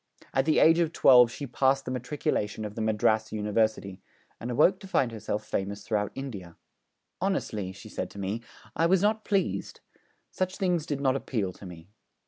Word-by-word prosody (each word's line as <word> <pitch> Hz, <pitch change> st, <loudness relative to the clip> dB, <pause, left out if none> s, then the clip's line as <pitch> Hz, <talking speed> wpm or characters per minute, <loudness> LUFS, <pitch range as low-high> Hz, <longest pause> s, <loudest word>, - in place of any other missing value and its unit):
At 135 Hz, 0 st, +2 dB
the 155 Hz, -, +3 dB
age 165 Hz, +1 st, +6 dB
of 165 Hz, -2 st, +1 dB
twelve 125 Hz, -2 st, +7 dB
she 140 Hz, -, -6 dB
passed 135 Hz, +2 st, +1 dB
the 125 Hz, -, -4 dB
Matriculation 125 Hz, -4 st, -2 dB
of 105 Hz, -, -6 dB
the 110 Hz, -, -5 dB
Madras 110 Hz, 0 st, +1 dB
University, 105 Hz, -2 st, -1 dB, 0.4 s
and 120 Hz, -, -5 dB
awoke 155 Hz, +10 st, +3 dB
to 195 Hz, -, -10 dB
find 130 Hz, -10 st, +1 dB
herself 105 Hz, -1 st, -4 dB
famous 100 Hz, 0 st, -3 dB
throughout 105 Hz, -2 st, -1 dB
India. 100 Hz, -11 st, -7 dB, 0.6 s
'Honestly,' 110 Hz, -, -1 dB
she 100 Hz, +3 st, -12 dB
said 95 Hz, -3 st, -4 dB
to -, -, -14 dB
me, 100 Hz, +4 st, -3 dB, 0.3 s
'I 165 Hz, -, +3 dB
was 190 Hz, +2 st, +3 dB
not 215 Hz, +1 st, +2 dB
pleased; 200 Hz, -2 st, -1 dB, 0.5 s
such 185 Hz, 0 st, -2 dB
things 180 Hz, -5 st, 0 dB
did 140 Hz, -2 st, -2 dB
not 135 Hz, -1 st, +2 dB
appeal 110 Hz, -8 st, -2 dB
to 95 Hz, -, -11 dB
me.' 90 Hz, +2 st, -12 dB
120 Hz, 180 wpm, -28 LUFS, 105-150 Hz, 0.6 s, twelve